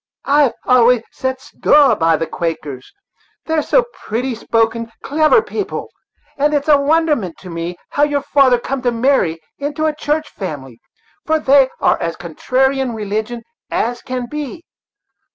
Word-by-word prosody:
I've 280 -3 +3
always 245 -2 +4
set 260 0 -3
store 290 0 +3
by 165 -1 +2
the 165 - -2
Quakers, 155 -5 -5 0.5
they 320 - -3
are 315 - +2
so - - +2
pretty 250 - -3
spoken, 230 0 0
clever 310 +9 +3
people, 410 -1 -5 0.5
and 295 +1 +2
it's 285 0 -1
a 290 -2 +5
wonderment 295 - +1
to 185 - -9
me 170 +1 -5
how 285 - -1
your 290 -1 +2
father 270 -4 +4
come 260 +2 -4
to 245 -1 +1
marry 230 -9 +1 0.2
into 295 +2 -2
a 310 - +1
church 305 0 -1
family; 135 - -7 0.5
for 315 0 +3
they 275 -3 +4
are - - +2
as 165 0 -2
contrary 260 - 0
in 255 -3 -2
religion 220 +3 -3 0.3
as 240 +1 -1
can 255 -1 -4
be. 300 +5 -6
255 Hz, 155 wpm, -17 LUFS, 215-290 Hz, 0.5 s, a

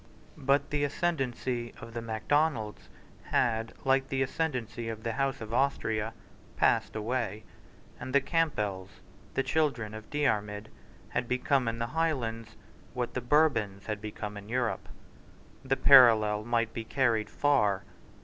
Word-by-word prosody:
But 140 +1 +1
the 145 -1 0
ascendancy 130 -6 -2
of 115 0 -10
the 115 - -4
Macdonalds 115 +1 -1 0.4
had, 115 -2 +1
like 135 0 +3
the 135 0 0
ascendancy 125 -6 -3
of 110 -1 -6
the 115 - -1
House 135 0 -1
of 110 0 -6
Austria, 115 -4 0 0.4
passed - - +2
away; 110 -1 -2 0.6
and 130 - -6
the 140 - +5
Campbells, 105 - -1 0.5
the 135 - +2
children 135 -6 0
of 110 0 -9
Diarmid, 105 -8 -1 0.4
had 125 - -2
become 125 +1 +1
in 115 0 -1
the 115 - -1
Highlands 115 -9 -1 0.4
what 125 -1 -2
the 125 - -2
Bourbons 120 -8 +2
had 105 -2 -4
become 105 -1 -6
in 100 +1 -10
Europe. 120 -1 -1 0.7
The 135 0 0
parallel 110 -5 +7
might 115 -1 0
be 115 - -4
carried 115 -3 +1
far. 105 -9 +2
120 Hz, 140 wpm, -29 LUFS, 110-135 Hz, 0.7 s, parallel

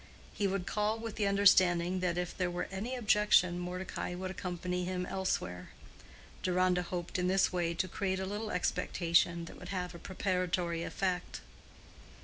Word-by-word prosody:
He 200 - 0
would 190 -1 -2
call 210 +3 0
with 225 -1 -6
the 205 -3 +2
understanding 185 -3 +4
that 180 -1 0
if 180 0 -2
there 180 -2 0
were 175 0 -3
any 215 +7 -3
objection, 210 -6 +4
Mordecai 180 0 -4
would 185 +1 -4
accompany 180 0 -3
him 180 0 -2
elsewhere. 90 - -2 0.7
Deronda 180 0 +2
hoped 175 0 -4
in 180 - +1
this 190 0 +3
way 170 -1 0
to 185 - 0
create 190 +1 -1
a 190 - -2
little 210 +3 -4
expectation 170 -2 +1
that - - -11
would - - -9
have 180 -2 -3
a 170 - -9
preparatory 180 -3 -1
effect. 180 +1 -2
180 Hz, 160 wpm, -32 LUFS, 175-195 Hz, 0.7 s, understanding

